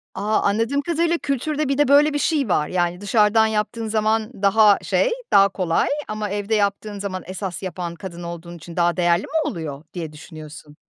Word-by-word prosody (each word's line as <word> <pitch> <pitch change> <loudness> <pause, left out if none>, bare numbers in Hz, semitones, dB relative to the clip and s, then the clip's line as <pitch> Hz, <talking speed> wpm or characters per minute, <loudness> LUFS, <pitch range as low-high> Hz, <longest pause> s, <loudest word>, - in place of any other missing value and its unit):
A, 215 +1 0
anladığım 225 +8 +1
kadarıyla, 335 +2 0
kültürde 295 +1 -2
bir 275 - 0
de 290 -1 +3
böyle 290 +2 +5
bir 290 - 0
şey 285 -6 0
var. 150 -4 +1
Yani, 175 +1 -1
dışarıdan 215 +1 +3
yaptığın 220 +1 -2
zaman 220 +1 0
daha 205 0 +5
şey, - - +1 0.2
daha 200 0 +6
kolay 180 -4 0 0.2
ama 215 -1 -4
evde 205 +2 -1
yaptığın 205 0 -1
zaman 190 -2 -4
esas 185 -1 -6
yapan 175 -2 -5
kadın 175 -2 -8
olduğun 170 0 -7
için 170 +1 -11
daha 175 0 +1
değerli 175 +1 +2
mi 310 0 -1
oluyor, 155 - -6
diye 165 -4 -5
düşünüyorsun? 155 -1 -11
205 Hz, 180 wpm, -22 LUFS, 175-225 Hz, 0.2 s, daha